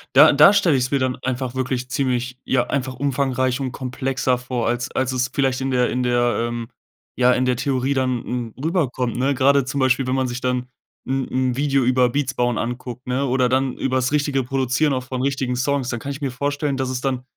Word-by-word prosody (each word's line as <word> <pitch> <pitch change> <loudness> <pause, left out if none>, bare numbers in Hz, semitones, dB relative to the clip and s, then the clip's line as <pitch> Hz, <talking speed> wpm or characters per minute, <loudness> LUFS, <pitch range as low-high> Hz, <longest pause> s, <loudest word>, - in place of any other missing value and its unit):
Da - - +9
da 150 +7 +7
stelle 190 -7 +3
ich 125 - +1
es - - -6
mir 140 - +2
dann 130 -1 -1
einfach 130 -1 -3
wirklich 130 -1 -2
ziemlich 125 -1 -1
ja, 125 -2 +1
einfach 130 -2 -2
umfangreich 130 -1 0
und 130 -2 -3
komplexer 130 0 -1
vor, 125 -1 -3
als 120 +1 -2
als 130 -1 -1
es 130 0 0
vielleicht 135 -2 +1
in 135 0 -2
der 125 -1 +2
in 125 - -1
der 120 -1 +2
ähm, 120 -1 -5 0.5
ja, 125 0 +4
in 130 - +1
der 125 -1 +2
Theorie 130 +1 -1
dann 130 -2 0
n 120 -3 -4
r 130 - -10
rüberkommt, 130 -8 0
ne? 135 +3 +1
Grade 140 +1 +3
zum 130 +2 -3
Beispiel, 130 0 +2
wenn 130 - -1
man 130 -1 0
sich 120 0 -4
dann 125 0 -1 0.4
'n 135 0 -1
'n 130 -1 0
Video 140 -1 +2
über 125 0 +3
Beats 130 0 -1
bauen 120 -2 0
anguckt, 125 +1 -5
ne, 130 +2 0
oder 130 -1 +2
dann 130 0 +1
übers 130 0 -1
richtige 145 -2 +1
Produzieren 135 +3 0
auch 130 -1 -2
von 130 0 -4
richtigen 135 -2 -1
Songs, 130 0 0
dann 120 - -3
kann 140 +4 -5
ich 140 +2 -7
mir 135 -2 -2
vorstellen, 140 +2 -2
dass 130 -1 -1
es 130 -1 -3
dann 130 -2 -2
130 Hz, 230 wpm, -21 LUFS, 125-135 Hz, 0.5 s, Da